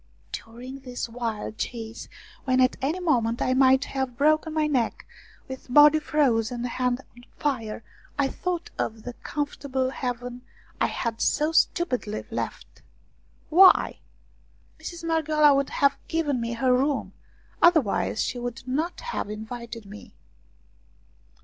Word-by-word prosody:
During 250 +4 -8
this 250 -2 -5
wild 225 -2 -4
chase, 225 -1 -5 0.4
when 255 -1 +2
at 255 0 +4
any 300 +7 0
moment 240 -9 +1
I 255 - +1
might 265 0 +5
have 265 -3 -3
broken 310 +2 +3
my 310 -1 +1
neck, 260 -7 0 0.4
with 260 -1 -9
body 295 +3 +7
frozen 245 -6 +1
and 245 - -1
head 250 0 0 0.2
on 245 - -15
fire, 230 -7 -2 0.3
I 280 -1 +2
thought 350 +4 -4
of 220 -1 -3
the 245 - -6
comfortable 275 -2 -3
haven 245 -1 -4 0.4
I - - +3
had 230 -2 -3
so 305 +2 +2
stupidly 250 -10 +1
left. - - -5 0.7
Why? 370 +4 +6 0.8
Mistress 345 -1 -7
Marghioala 310 -2 +4
would 275 0 +1
have 280 0 +2
given 295 -6 0
me 230 0 -2
her 250 +2 +2
room, 275 +2 0 0.5
otherwise 315 - +3
she 245 - -3
would 245 +1 -6
not 310 +7 -2
have 480 - -4
invited 230 +1 -7
me. 205 +2 -12
260 Hz, 135 wpm, -26 LUFS, 235-295 Hz, 0.8 s, body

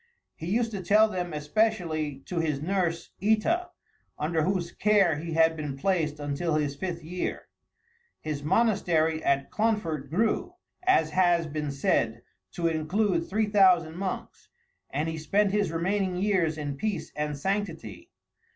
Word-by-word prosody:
He 160 - -7
used 225 +4 +1
to 200 -3 -4
tell 210 +5 +5
them 180 -4 -3
especially 155 -3 -1
to 180 - -3
his 155 -4 0
nurse 170 0 -1
Ita, 320 - +2 0.5
under 160 +2 0
whose 180 0 0
care 200 -7 +3
he 165 +2 -5
had 160 0 +4
been 150 -3 -5
placed 155 -2 0
until 145 +3 -1
his 145 -2 0
fifth 175 +2 -4
year. 180 +3 -4 0.7
His 150 -2 -4
monastery 165 -4 +2
at 140 0 +1
Clonfert 185 -11 -1
grew, 220 - 0 0.3
as 265 - +3
has 175 0 +3
been 150 -1 -3
said, 115 -4 0 0.3
to 170 - -3
include 165 +3 0
three 215 +2 +1
thousand 185 -6 +4
monks; 190 +1 -5 0.4
and 150 +4 -2
he 160 -1 -3
spent 200 +6 +2
his 205 -4 +1
remaining 185 +3 0
years 180 -5 +1
in 145 -2 -4
peace 205 -1 -3
and 150 -1 -2
sanctity. 195 - -3
170 Hz, 145 wpm, -27 LUFS, 155-200 Hz, 0.7 s, tell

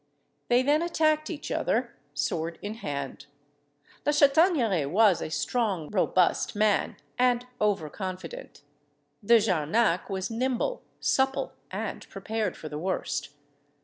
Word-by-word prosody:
They 245 +1 +4
then 295 +3 +3
attacked 310 -2 +1
each 315 -4 -6
other, 235 +1 0 0.2
sword 160 +4 -2
in 205 +1 -3
hand. 140 - -5 0.8
La 295 - +2
Chataigneraie 280 - +4
was 200 0 +4
a - - -3
strong 165 +2 -1
robust 185 -2 +2
man, 210 -1 +2 0.2
and 245 -1 +3
over 205 -7 +1
confident; 185 -4 -7 0.6
De 235 +3 +6
Jarnac 185 0 +1
was 190 +1 -3
nimble, 255 - -1 0.2
supple, 265 0 +1 0.2
and - - -5
prepared 220 -4 -3
for 155 - -7
the 150 0 -5
worst. 150 -5 -2
210 Hz, 120 wpm, -27 LUFS, 170-250 Hz, 0.8 s, De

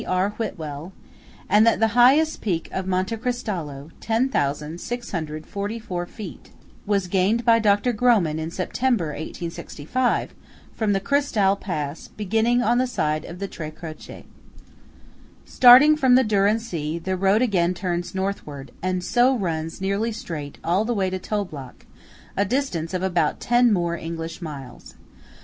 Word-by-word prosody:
R. 185 +2 +1
Whitwell; 165 -6 -6 0.5
and 210 +2 +5
that 230 - +3
the 225 0 +3
highest 265 +7 +4
peak 175 -6 -2
of 190 0 -3
Monte 190 +4 0
Cristallo 175 - -4
(10,644 180 - -3
feet) 200 -4 -10 0.4
was 200 -2 +1
gained 195 +6 +1
by 230 -1 +5
Dr. 210 +3 +2
Grohmann 205 -10 +2
in 160 0 -3
September, 190 +1 -1
1865, 165 - -3 0.4
from 215 -2 0
the 195 - +1
Cristall 210 -5 +2
pass, 155 -6 -5
beginning 225 +4 +1
on 240 +1 +2
the 255 - +1
side 155 -10 -1
of 170 - -8
the 200 +2 -4
Tre 155 -5 -7
Croce. 155 0 -10 1.2
Starting 260 +5 +8
from 260 -4 +4
the 260 - +5
Dürren 210 0 +2
See, 165 -8 -4
the 185 +3 -2
road 195 +5 +3
again 180 -6 +1
turns 175 0 -3
northward, 170 -8 -4
and 185 0 -1
so 250 +6 +3
runs 165 -5 -3
nearly 200 +4 -1
straight 155 -9 -6
all 180 +5 +2
the 235 +1 -1
way 190 -2 0
to 185 - -3
Toblach, 180 -11 -5 0.5
a 200 - +2
distance 190 - -2
of 185 - -2
about 175 -5 +1
ten 240 0 +3
more 175 -4 +1
English 165 0 -6
miles. 140 -6 -9
190 Hz, 140 wpm, -23 LUFS, 165-230 Hz, 1.2 s, Starting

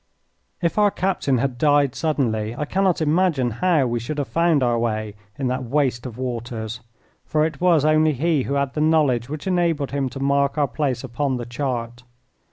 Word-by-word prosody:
If 170 +5 +1
our 205 -1 +5
captain 180 -9 0
had 125 0 -2
died 145 -3 +3
suddenly 115 -8 -1
I 150 - -3
cannot 185 0 +1
imagine 155 -5 +2
how 175 -7 +3
we 120 -1 -1
should 130 +6 -5
have 145 - -2
found 165 -4 +2
our 120 -1 +1
way 110 -2 -2 0.2
in 135 - -3
that 130 0 -2
waste 130 -1 0
of 120 -2 -9
waters, 120 -3 -4 0.4
for 155 0 +1
it 155 -2 -5
was 170 -5 +4
only 155 0 +4
he 155 +2 +1
who 140 +2 -2
had 140 -1 -1
the 150 - -2
knowledge 145 -6 +2
which 150 0 -6
enabled 170 -6 0
him 135 -2 -1
to 125 - -8
mark 140 +1 +1
our 145 -1 +2
place 135 -4 -2
upon 130 +1 -2
the 120 - -5
chart. 120 -2 -4
140 Hz, 190 wpm, -22 LUFS, 120-155 Hz, 0.4 s, our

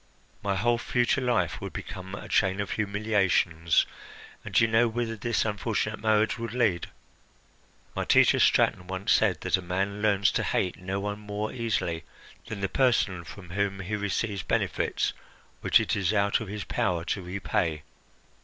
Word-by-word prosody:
My 100 -1 -1
whole 120 +4 +2
future 120 +3 +1
life 125 -2 0
would - - -6
become 95 +1 -7
a - - -8
chain 95 -1 +2
of 100 - -2
humiliations, 100 -6 +2 0.6
and - - -8
do - - +6
you - - +5
know 115 +1 +4
whither 115 0 -2
this 115 +2 0
unfortunate 110 0 -1
marriage 110 +1 +2
would 115 0 -5
lead? 100 -9 +1 1.1
My - - -1
teacher - - +5
Straton 90 - +3
once 95 +3 -2
said 95 -8 +3
that - - +2
a - - -5
man 95 +3 -2
learns 100 -3 +3
to - - 0
hate 90 - 0
no 95 +1 -3
one 105 +1 -3
more 105 +1 -4
easily 90 -9 -1 0.4
than 100 -2 -6
the 95 - +1
person 105 -7 +1
from 90 0 -11
whom 100 +1 -1
he 100 +3 -3
receives 100 0 -2
benefits 85 - 0 0.5
which - - +4
it - - 0
is 100 -2 +1
out 100 -1 +2
of 110 - -6
his 105 +1 -5
power 85 -3 -1
to 95 - -2
repay. 90 -4 -2
100 Hz, 170 wpm, -27 LUFS, 95-110 Hz, 1.1 s, do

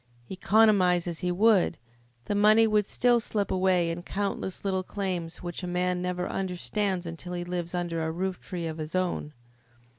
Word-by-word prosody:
Economise 190 -3 +4
as 170 -2 -4
he 180 0 -1
would, 195 -3 +3 0.5
the - - -1
money 215 +2 +5
would 210 -2 +2
still 245 -1 +3
slip 210 -3 -2
away 185 -2 +2
in 165 - -4
the - - -7
countless 195 0 -3
little 190 -1 +1
claims 185 -4 -4
which 175 +1 -5
a 180 - -4
man 180 0 0
never 180 0 -2
understands 190 0 -2
until 170 +2 -7
he 175 0 -3
lives 175 0 -4
under 170 -2 -2
a 160 - -1
rooftree 180 -1 -4
of 160 0 -6
his 155 +3 -5
own. 180 -4 -1
180 Hz, 175 wpm, -27 LUFS, 175-200 Hz, 0.5 s, money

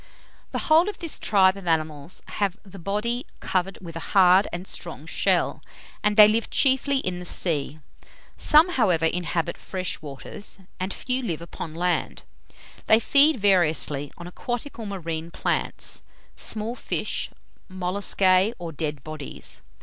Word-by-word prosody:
The - - -2
whole 325 +5 +5
of 420 - -7
this 330 -2 -2
tribe 190 -2 +4
of 195 -3 -10
animals 155 0 -2
have 200 -2 -1
the 195 -1 -12
body 210 +7 -2
covered 185 +1 -1
with 165 -2 -9
a - - -4 0.2
hard 185 +1 +6
and 175 +2 -5
strong - - -4
shell, - - +1 0.4
and 210 0 +1
they 210 -1 +10
live 225 +2 0
chiefly 270 +1 +2
in 185 -9 -2
the - - -7
sea. 155 -5 +2 0.6
Some, 310 +4 +5
however, 185 - +2
inhabit 170 0 -1
fresh 185 -2 -4
waters, 145 - -8 0.2
and 185 +2 -2
a - - -4
few 255 0 -1
live 175 -11 -3
upon 165 -1 -8
land. 180 +1 -1 0.6
They 220 - +7
feed 285 +6 +5
variously, 160 -8 +2
on 170 - -9
aquatic 240 +8 -5
or 220 - -5
marine 165 -4 -5
plants, - - -1 0.3
small 220 +1 -1
fish, - - -2 0.4
molluscae, 185 +2 +1
or 170 -2 -6
dead 150 -3 -4
bodies. 155 -2 -6
185 Hz, 150 wpm, -24 LUFS, 165-220 Hz, 0.6 s, they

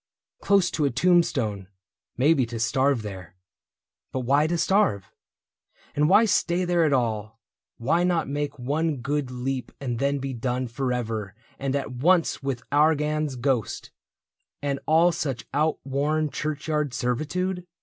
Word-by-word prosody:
Close 195 -3 +3
to 155 - -1
a 140 - +3
tombstone 130 - +1 0.2
— - - -68
maybe 140 +2 +4
to 115 -1 -5
starve 130 +1 +1
there. 95 -4 -8 0.8
But 130 - -2
why 140 +5 +3
to 170 +1 0
starve? 160 - +1 0.8
And 150 +2 +3
why 210 +4 +6
stay 180 -3 +1
there 175 -2 +2
at 150 - +2
all? 115 -4 -1 0.4
Why 155 +9 +1
not 175 -2 +1
make 145 +1 -3
one 145 +4 -1
good 135 +1 -2
leap 125 +1 -4
and 120 -4 -3
then 140 +1 +1
be 135 -1 -4
done 125 +1 -2
Forever 115 -5 -3 0.2
and 135 0 -1
at 140 - -2
once 165 +7 +2
with 135 -4 -3
Argan's 150 -1 +2
ghost 125 -4 -1 0.7
And 140 -1 -2
all 165 +3 +5
such 150 -8 -3
outworn 150 0 0
churchyard 150 -1 -2
servitude 175 +9 -2
140 Hz, 140 wpm, -25 LUFS, 125-155 Hz, 0.8 s, why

